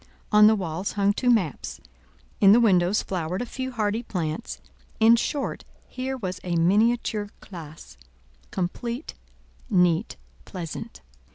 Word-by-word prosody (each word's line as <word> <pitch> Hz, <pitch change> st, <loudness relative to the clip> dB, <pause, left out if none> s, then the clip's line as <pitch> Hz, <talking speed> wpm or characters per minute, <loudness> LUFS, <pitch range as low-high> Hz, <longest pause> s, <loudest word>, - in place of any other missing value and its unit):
On 210 Hz, -1 st, +7 dB
the 220 Hz, -, +5 dB
walls 185 Hz, -1 st, -3 dB
hung 200 Hz, 0 st, +2 dB
two 245 Hz, +4 st, 0 dB
maps; 195 Hz, -, 0 dB, 0.6 s
in 200 Hz, -1 st, +7 dB
the 235 Hz, -, +6 dB
windows 190 Hz, -3 st, +3 dB
flowered 180 Hz, 0 st, -3 dB
a 245 Hz, -, -2 dB
few 260 Hz, +1 st, -5 dB
hardy 220 Hz, -1 st, -1 dB
plants; 180 Hz, -2 st, -4 dB, 0.4 s
in 225 Hz, +1 st, +7 dB
short, 275 Hz, +4 st, -2 dB, 0.2 s
here 260 Hz, +1 st, -4 dB
was 185 Hz, -6 st, -4 dB
a 175 Hz, -1 st, -2 dB
miniature 210 Hz, +4 st, +2 dB
classe—complete, 150 Hz, -, -7 dB, 0.6 s
neat, 180 Hz, -1 st, +2 dB, 0.3 s
pleasant. 170 Hz, -, -7 dB
200 Hz, 120 wpm, -25 LUFS, 170-230 Hz, 0.6 s, On